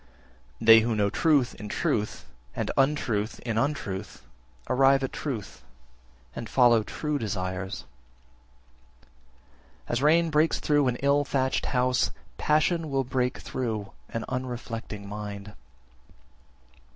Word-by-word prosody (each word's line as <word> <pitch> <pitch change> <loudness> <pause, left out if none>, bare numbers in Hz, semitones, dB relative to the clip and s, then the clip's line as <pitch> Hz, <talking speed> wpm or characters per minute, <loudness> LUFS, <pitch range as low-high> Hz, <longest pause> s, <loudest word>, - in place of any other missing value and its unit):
12. 115 - -7
They 115 0 +10
who 115 0 0
know 100 -1 +1
truth 150 -7 +2
in 105 - -7
truth, 105 +1 -1 0.3
and - - -2
untruth 125 -6 +1
in 115 -2 -1
untruth, 105 -8 -3 0.4
arrive 135 +1 +4
at 135 - -3
truth, 110 - -5 0.7
and 115 - -6
follow 120 -3 +5
true 150 +6 -3
desires. 95 - -4 1.2
13. - - -26 0.8
As 120 - 0
rain 165 +3 +4
breaks 155 +2 +3
through 145 -2 +2
an 125 - +1
ill 140 +1 +4
thatched 130 -2 0
house, 125 0 +2 0.3
passion 155 +1 +2
will 135 -1 +1
break 125 +1 -1
through 110 -6 -4 0.2
an 115 - -4
unreflecting 115 -5 -5
mind. 105 0 -7
125 Hz, 120 wpm, -27 LUFS, 105-140 Hz, 1.2 s, They